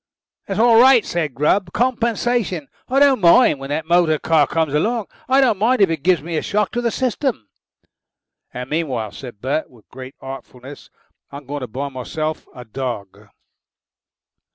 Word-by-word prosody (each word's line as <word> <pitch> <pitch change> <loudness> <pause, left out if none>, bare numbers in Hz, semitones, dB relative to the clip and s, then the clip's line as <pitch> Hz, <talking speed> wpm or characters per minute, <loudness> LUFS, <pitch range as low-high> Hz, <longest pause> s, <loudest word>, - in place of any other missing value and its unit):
"That's 195 +1 -3
all 230 0 +6
right," 260 -2 +6
said 160 -6 -3
Grubb. 175 +5 +1
"Compensation. 235 - -1 0.2
I 260 - 0
don't 275 -4 +4
mind 175 - +5
when 135 0 -8
that 155 +2 -2
motor 170 -2 +3
car 155 -2 +2
comes 160 -3 -1
along. 220 +8 0 0.2
I 265 +1 +4
don't 230 -7 +2
mind 245 +5 +2
even 190 -5 +4
if 160 - -4
it - - -33
gives 175 -4 +2
me 165 0 -3
a - - 0
shock 210 0 -1
to 240 - -2
the 235 - 0
system." 255 - -2 1.0
"And 125 0 -6
meanwhile," 130 -10 -2
said 120 -6 -11
Bert, 140 +5 -2
with 115 -4 -21
great 130 +1 -10
artfulness, 135 0 -10 0.4
"I'm 140 0 -9
going 145 +2 -5
to 130 - -5
buy 135 +5 -5
myself 155 +4 -5
a 125 - -10
dog." 120 -5 -6
160 Hz, 175 wpm, -20 LUFS, 135-225 Hz, 1.0 s, all